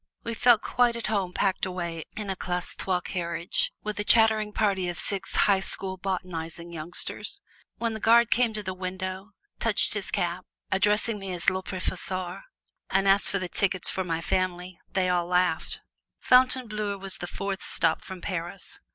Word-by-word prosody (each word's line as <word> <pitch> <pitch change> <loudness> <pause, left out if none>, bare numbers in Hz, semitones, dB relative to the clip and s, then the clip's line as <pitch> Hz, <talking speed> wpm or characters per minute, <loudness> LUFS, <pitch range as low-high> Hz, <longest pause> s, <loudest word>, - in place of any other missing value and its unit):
We 230 - -3
felt 235 0 +5
quite 245 -1 +2
at 235 - -4
home 200 -4 0
packed 190 +1 0
away 170 -3 -3
in 210 -2 -3
a - - -2
Classe 180 -1 -3
Trois 185 -2 0
carriage 170 -1 0
with 210 -1 -4
a - - 0
chattering 220 -1 +4
party 195 -4 +1
of 175 - -4
six 195 +2 -3
High 200 -2 +4
School 190 0 -1
botanizing 175 -3 -4
youngsters. 165 +2 -4 0.4
When 230 -1 -1
the 220 - -4
guard 235 +1 +5
came 240 -2 +3
to 210 - -3
the 185 -1 -3
window, 185 +2 -5 0.3
touched - - +2
his - - -3
cap, - - -2 0.2
addressing 210 +3 +2
me 195 -1 -5
as 175 -2 +2
Le 190 0 -2
Professeur, 185 0 -3 0.5
and 195 +1 +2
asked 195 +1 +5
for 195 - 0
the 185 -1 -3
tickets 185 0 +1
for 190 - -1
my 165 -2 -2
family, 180 0 -1
they 190 -2 +1
all 175 -1 +1
laughed. 180 -2 +1 0.4
Fontainebleau 235 -5 +3
was 195 -1 -1
the 175 - -5
fourth 195 +1 -4
stop 165 -2 +2
from 190 -2 -8
Paris. 180 +1 -5
190 Hz, 175 wpm, -27 LUFS, 180-210 Hz, 0.5 s, felt